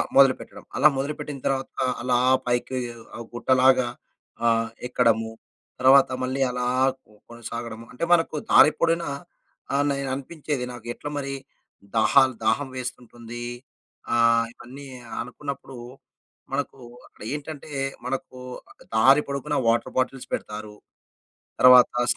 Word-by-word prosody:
మొదలుపెట్టడం. 135 Hz, -1 st, +3 dB
అలా 145 Hz, -, +7 dB
మొదలుపెట్టిన 140 Hz, 0 st, -4 dB
తర్వాత, 135 Hz, -1 st, -1 dB, 0.3 s
అలా 125 Hz, 0 st, +2 dB, 0.3 s
పైకి 125 Hz, +1 st, 0 dB, 0.4 s
ఆహ్, 115 Hz, -, -7 dB
గుట్టలాగా 130 Hz, 0 st, +4 dB, 0.6 s
ఆహ్, 115 Hz, 0 st, +2 dB, 0.2 s
ఎక్కడము 115 Hz, -3 st, +2 dB, 0.5 s
తర్వాత 135 Hz, +1 st, +6 dB
మళ్ళీ 130 Hz, +1 st, -2 dB
అలా 125 Hz, 0 st, -2 dB, 0.4 s
కొ 105 Hz, -, -25 dB, 0.2 s
కొనసాగడము. 115 Hz, -1 st, -7 dB
అంటే, 125 Hz, -, -6 dB
మనకు 165 Hz, -2 st, +2 dB, 0.2 s
దారి 150 Hz, -, +8 dB
పొడిన 170 Hz, 0 st, +2 dB, 0.7 s
ఆహ్, 145 Hz, -, +2 dB
నేను 140 Hz, -1 st, -2 dB
అనిపించేది, 140 Hz, -1 st, -4 dB
నాకు 120 Hz, -2 st, -11 dB
ఎట్ల 145 Hz, -, -8 dB
మరి, 140 Hz, -1 st, -3 dB, 0.6 s
దాహాలు 130 Hz, +4 st, +4 dB
దాహం 120 Hz, +6 st, +2 dB
వేస్తుంటుంది, 120 Hz, -1 st, -7 dB, 0.7 s
ఆహ్, 115 Hz, 0 st, +4 dB
ఇవన్నీ 135 Hz, +4 st, -11 dB, 0.3 s
అనుకున్నప్పుడు 135 Hz, 0 st, -7 dB, 0.8 s
మనకు 135 Hz, 0 st, -2 dB, 0.3 s
అక్కడ -, -, -15 dB
ఏంటంటే, 150 Hz, 0 st, -7 dB, 0.3 s
మనకు 130 Hz, -1 st, -4 dB, 0.3 s
ఆహ్, -, -, -19 dB
దారి 135 Hz, +6 st, +6 dB
పొడుగున 140 Hz, -1 st, -2 dB
వాటర్ 115 Hz, -, 0 dB
బాటిల్స్ 130 Hz, 0 st, -2 dB
పెడతారు. 105 Hz, 0 st, -5 dB, 0.9 s
తర్వాత 125 Hz, -1 st, +8 dB, 0.2 s
స్ -, -, -9 dB
130 Hz, 115 wpm, -25 LUFS, 120-140 Hz, 0.9 s, దారి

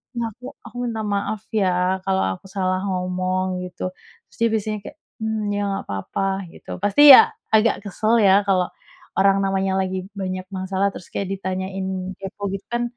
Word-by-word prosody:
"Ya, 230 Hz, -1 st, -2 dB
aku 250 Hz, +5 st, -11 dB
aku 235 Hz, 0 st, -13 dB
minta 225 Hz, -2 st, -3 dB
maaf, 205 Hz, 0 st, -2 dB
ya, 185 Hz, -2 st, +1 dB
kalau 190 Hz, 0 st, +2 dB, 0.2 s
aku -, -, -15 dB
salah 185 Hz, -1 st, -1 dB
ngomong." 185 Hz, 0 st, -1 dB
Gitu, 180 Hz, -, -9 dB, 0.5 s
terus -, -, -21 dB
dia 230 Hz, -, +4 dB
biasanya 215 Hz, 0 st, -2 dB
kayak, 300 Hz, -, -10 dB, 0.3 s
mmm, 220 Hz, -1 st, -1 dB
"Ya 205 Hz, 0 st, -1 dB
nggak 195 Hz, 0 st, -2 dB
apa-apa." 95 Hz, -, -3 dB, 0.3 s
Gitu. -, -, -11 dB
Pasti, 205 Hz, +7 st, +3 dB
ya, -, -, +12 dB, 0.3 s
agak 220 Hz, -1 st, +3 dB
kesel, 215 Hz, +3 st, +1 dB
ya, 200 Hz, +1 st, +5 dB
kalau 185 Hz, -2 st, +3 dB, 0.5 s
orang 195 Hz, 0 st, +4 dB
namanya 195 Hz, 0 st, 0 dB
lagi 185 Hz, 0 st, -3 dB
banyak 185 Hz, -1 st, -4 dB
masalah 190 Hz, +1 st, 0 dB
terus 180 Hz, -, -11 dB
kayak 195 Hz, -, -3 dB
ditanyain 190 Hz, 0 st, -4 dB
kepo, 200 Hz, +1 st, -5 dB
gitu, 195 Hz, 0 st, -5 dB
kan, 240 Hz, 0 st, 0 dB
195 Hz, 170 wpm, -22 LUFS, 185-205 Hz, 0.5 s, ya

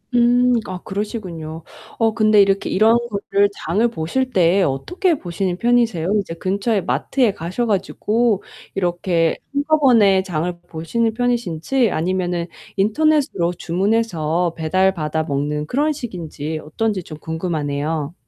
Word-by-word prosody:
음 240 Hz, +1 st, +4 dB, 0.3 s
아 185 Hz, -1 st, -5 dB
그러시군요. 180 Hz, -6 st, -5 dB, 0.3 s
어 225 Hz, -1 st, +2 dB
근데 215 Hz, -1 st, +4 dB
이렇게 195 Hz, 0 st, +2 dB
이런 220 Hz, +4 st, +4 dB
것들 200 Hz, -1 st, +1 dB, 0.2 s
장을 205 Hz, +9 st, +2 dB
보실 235 Hz, +8 st, -2 dB
때 180 Hz, +2 st, +3 dB
어떻게 335 Hz, -, 0 dB
보시는 180 Hz, -1 st, -3 dB
편이세요? 230 Hz, -7 st, +2 dB
이제 165 Hz, -3 st, -7 dB
근처에 200 Hz, +4 st, 0 dB
마트에 200 Hz, -, +1 dB
가셔 180 Hz, +9 st, -3 dB
가지고 215 Hz, +1 st, 0 dB, 0.3 s
이렇게 175 Hz, -2 st, 0 dB, 0.2 s
한꺼번에 265 Hz, -10 st, +4 dB
장을 175 Hz, -1 st, -3 dB
보시는 220 Hz, +8 st, -1 dB
편이신지 240 Hz, -1 st, 0 dB
아니면은 175 Hz, 0 st, -1 dB, 0.3 s
인터넷으로 220 Hz, -, +2 dB
주문해서 175 Hz, -3 st, 0 dB
배달받아먹는 155 Hz, -4 st, 0 dB
그런 290 Hz, -, +1 dB
식인지 160 Hz, -, -5 dB
어떤지 200 Hz, +5 st, -2 dB
좀 155 Hz, -2 st, -9 dB
궁금하네요. 155 Hz, -2 st, -3 dB
190 Hz, 310 characters per minute, -20 LUFS, 165-225 Hz, 0.3 s, 음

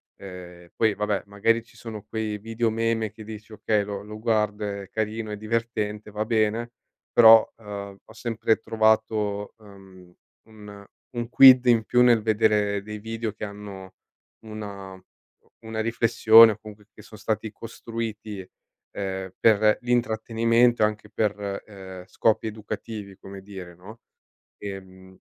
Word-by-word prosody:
ehm, 90 Hz, -2 st, -11 dB
poi 110 Hz, -2 st, +2 dB
vabbè 105 Hz, -1 st, -2 dB
magari 110 Hz, +3 st, +1 dB
ci 115 Hz, -, -22 dB
sono 110 Hz, -2 st, -8 dB
quei 110 Hz, -2 st, -4 dB
video 115 Hz, +2 st, -1 dB
meme 115 Hz, -1 st, -1 dB
che 110 Hz, +1 st, -12 dB
dici: 110 Hz, 0 st, -10 dB
"Okay, 105 Hz, 0 st, 0 dB
lo 100 Hz, -1 st, -5 dB
lo 105 Hz, +1 st, -9 dB
guardo, 105 Hz, -2 st, 0 dB
è 100 Hz, -1 st, -6 dB
carino, 110 Hz, 0 st, -3 dB
è 105 Hz, -, -5 dB
divertente, 110 Hz, -1 st, -3 dB
va 105 Hz, +1 st, -3 dB
bene." 115 Hz, +1 st, 0 dB, 0.4 s
Però, 115 Hz, -1 st, +8 dB
ehm, 100 Hz, -2 st, -8 dB
ho -, -, -17 dB
sempre 110 Hz, -1 st, 0 dB
trovato, 110 Hz, -2 st, 0 dB
ehm, 95 Hz, -4 st, -16 dB, 0.3 s
un 105 Hz, -2 st, -13 dB, 0.3 s
un 120 Hz, -1 st, -3 dB
quid 130 Hz, -1 st, +8 dB
in 115 Hz, -2 st, +4 dB
più 125 Hz, -, +3 dB
nel 120 Hz, -2 st, +5 dB
vedere 105 Hz, -2 st, +1 dB
dei 105 Hz, +1 st, -7 dB
video 115 Hz, +1 st, -4 dB
che 110 Hz, -, -6 dB
hanno 100 Hz, -2 st, -10 dB, 0.5 s
una 100 Hz, -3 st, -8 dB
uhm, 95 Hz, 0 st, -15 dB, 0.6 s
una 110 Hz, 0 st, -5 dB
riflessione 115 Hz, 0 st, +6 dB
o 105 Hz, -, -6 dB
comunque 105 Hz, -1 st, -13 dB
che -, -, -14 dB
son 110 Hz, -, -14 dB
stati 110 Hz, 0 st, -3 dB
costruiti, 110 Hz, -3 st, -7 dB, 0.4 s
ehm, 95 Hz, -1 st, -5 dB
per 110 Hz, -1 st, +4 dB
l'intrattenimento, 115 Hz, 0 st, +2 dB
anche 105 Hz, 0 st, -1 dB
per, 100 Hz, -1 st, -2 dB
ehm, 95 Hz, -3 st, -10 dB
scopi 110 Hz, +3 st, +1 dB
educativi, 105 Hz, -1 st, -7 dB
come 95 Hz, 0 st, -11 dB
dire, 95 Hz, -3 st, -10 dB
no. 105 Hz, +6 st, -14 dB, 0.6 s
Ehm, 95 Hz, -1 st, -10 dB
105 Hz, 140 wpm, -25 LUFS, 100-115 Hz, 0.6 s, Però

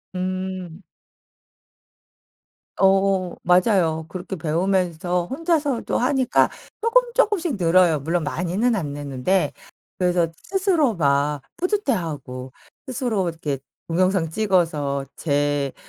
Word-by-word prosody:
음. 185 Hz, -1 st, -4 dB, 2.0 s
어 195 Hz, -2 st, +3 dB
맞아요. 180 Hz, -3 st, +3 dB
그렇게 185 Hz, +1 st, -6 dB
배우면서 175 Hz, +1 st, 0 dB
혼자서도 295 Hz, -, 0 dB
하니까 260 Hz, 0 st, +2 dB, 0.3 s
쪼끔 475 Hz, +1 st, +3 dB
쪼끔씩 400 Hz, -, +2 dB
늘어요 170 Hz, -2 st, +4 dB
물론 165 Hz, +4 st, -1 dB
많이는 180 Hz, +10 st, 0 dB
안 175 Hz, -8 st, -2 dB
느는데. 145 Hz, +6 st, 0 dB, 0.5 s
그래서 180 Hz, -2 st, +2 dB
스스로 365 Hz, -, +1 dB
막 145 Hz, -2 st, +1 dB, 0.2 s
뿌듯해하고 165 Hz, -, -2 dB, 0.3 s
스스로 245 Hz, -7 st, -1 dB
이렇게 160 Hz, -4 st, -3 dB, 0.3 s
동영상 185 Hz, 0 st, +2 dB
찍어서 160 Hz, -8 st, 0 dB
제 145 Hz, -2 st, 0 dB
180 Hz, 230 characters per minute, -22 LUFS, 160-225 Hz, 2.0 s, 늘어요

